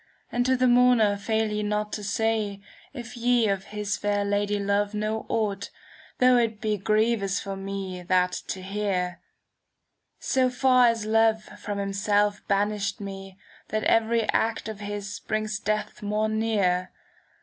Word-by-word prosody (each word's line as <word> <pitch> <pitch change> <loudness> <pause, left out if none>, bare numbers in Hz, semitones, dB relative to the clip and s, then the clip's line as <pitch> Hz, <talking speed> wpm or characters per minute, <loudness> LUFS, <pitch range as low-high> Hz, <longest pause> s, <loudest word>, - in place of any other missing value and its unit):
And 245 +1 0
to 260 0 +3
the 255 - +2
mourner 245 -4 +5
fail 220 +1 -1
ye 210 0 -1
not 210 0 -2
to 210 - -4
say 215 -1 -1 0.3
If 245 -3 -8
ye 240 -1 +2
of 195 -1 -1
his 210 0 -3
fair 205 0 0
Lady 205 0 0
love 205 +1 0
know 215 +1 -2
aught. 200 -3 -1 0.5
Though 250 0 +5
it 225 -3 0
be 215 -2 0
grievous 215 -1 +1
for 195 -1 -5
me 195 -1 -5
that 180 0 +2 0.2
to 185 - -5
hear. 190 -3 -2 1.0
So 260 -1 +1
far 255 -1 +4
as 230 -2 0
Love 220 0 +3
from 205 -1 -7
himself 205 +1 +1
banished 200 0 0
me, 195 -1 -8 0.2
'" - - -26
That 215 0 -1
every 230 0 +3
act 225 0 0
of 215 -2 -6
his 205 -1 -5
brings 215 -1 -2
death 215 +1 -2
more 210 +1 0
near. 200 -5 0
210 Hz, 155 wpm, -26 LUFS, 200-225 Hz, 1.0 s, mourner